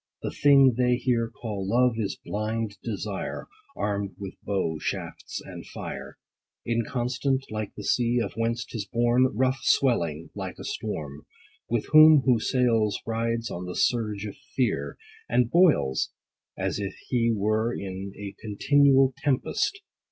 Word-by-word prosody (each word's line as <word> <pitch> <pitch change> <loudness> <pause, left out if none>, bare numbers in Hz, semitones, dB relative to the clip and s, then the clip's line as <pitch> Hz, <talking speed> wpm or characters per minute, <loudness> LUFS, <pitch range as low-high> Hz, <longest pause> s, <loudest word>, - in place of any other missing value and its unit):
The - - -2
thing 135 -3 +5
they 125 0 +4
here 120 -2 0
call 105 -5 -5
Love, 125 +2 +3
is 100 -3 -2
blind 110 0 -3
desire, 105 -3 -4 0.3
Arm'd 100 -1 -2
with 100 -2 -7
bow, 90 -6 -1
shafts, - - -5
and - - -8
fire; - - -7 0.5
Inconstant, 125 +3 -1
like 110 -1 -4
the 105 - -6
sea, 120 +3 +2
of 105 -5 -2
whence 115 +2 -1
'tis 105 -4 -6
born, 120 +3 +3
30 125 - -2
Rough, 130 +1 +2
swelling, 85 - +1
like - - -6
a - - -8
storm: 75 -1 -5 0.4
With 120 -2 0
whom 155 -2 +8
who 125 -4 +4
sails, 115 -5 +1
rides 115 0 -1
on 90 +1 -5
the 90 - -5
surge 105 -4 0
of 105 - -7 0.2
fear, 130 -2 0 0.3
And 125 -1 +2
boils, 165 - +3 0.5
as - - -2
if 100 -1 -4
he 115 -2 +2
were 110 +2 +1
In 95 -2 -5
a 100 -1 -6
continual 135 +5 +4
tempest. 145 - 0
115 Hz, 145 wpm, -26 LUFS, 100-125 Hz, 0.5 s, whom